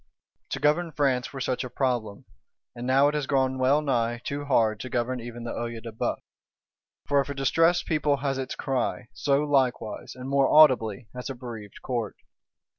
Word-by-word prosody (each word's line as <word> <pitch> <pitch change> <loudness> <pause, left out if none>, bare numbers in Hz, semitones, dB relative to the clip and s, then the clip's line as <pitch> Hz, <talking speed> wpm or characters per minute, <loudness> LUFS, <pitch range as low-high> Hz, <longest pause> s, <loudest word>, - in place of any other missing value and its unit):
To - - -3
govern 160 +3 +2
France 135 -4 0
were 135 - -7
such 130 0 -1
a 125 - -6
problem; 120 -6 -2 0.5
and 120 +1 -5
now 135 +2 +5
it 145 - 0
has 150 -3 -2
grown 130 -1 +1
well 140 +4 +3
nigh 120 -4 0
too 145 +1 -4
hard 110 -6 +2
to 130 - -6
govern 125 +1 -1
even 120 0 -8
the 115 - -4
Œil 115 -1 -4
de 115 - -6
Bœuf. 110 - -1 0.9
For 140 -1 +3
if 140 - -6
a 140 - -4
distressed 165 +6 +2
People 150 -3 +1
has 135 -1 -2
its 130 - -4
cry, 125 -3 -2
so 140 +3 +1
likewise, 130 -8 0
and 130 0 -7
more 140 0 +2
audibly, 125 -7 +5
has 125 +2 -6
a 135 - -4
bereaved 115 -5 -9
Court. 120 -5 -3
130 Hz, 190 wpm, -26 LUFS, 120-140 Hz, 0.9 s, now